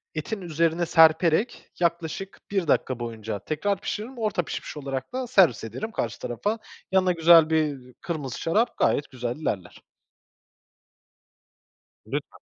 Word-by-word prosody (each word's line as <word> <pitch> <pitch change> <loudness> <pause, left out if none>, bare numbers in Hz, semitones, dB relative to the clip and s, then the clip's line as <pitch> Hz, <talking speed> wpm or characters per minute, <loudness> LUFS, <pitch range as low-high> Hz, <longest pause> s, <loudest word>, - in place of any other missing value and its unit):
etin 195 +7 -4
üzerine 165 0 0
serperek 165 +6 +3
yaklaşık 170 +2 -2
1 195 -5 0
dakika 130 -3 +1
boyunca 110 -3 -5
tekrar 180 - -2
pişiririm. 235 +5 -5
Orta 215 -6 0
pişmiş 155 - -6
olarak 135 - -5
da 255 0 -2
servis 190 - +4
ederim 125 - -5
karşı 115 - -3
tarafa. 205 - -2 0.3
Yanına 190 -1 +3
güzel 165 -1 +6
bir 145 -6 -1
kırmızı 150 -7 -4
şarap 215 +9 +1
gayet 145 - +1
güzel 125 -2 -3
ilerler. 100 - -4 2.2
Lütfen. - - -5
160 Hz, 125 wpm, -25 LUFS, 135-190 Hz, 2.2 s, güzel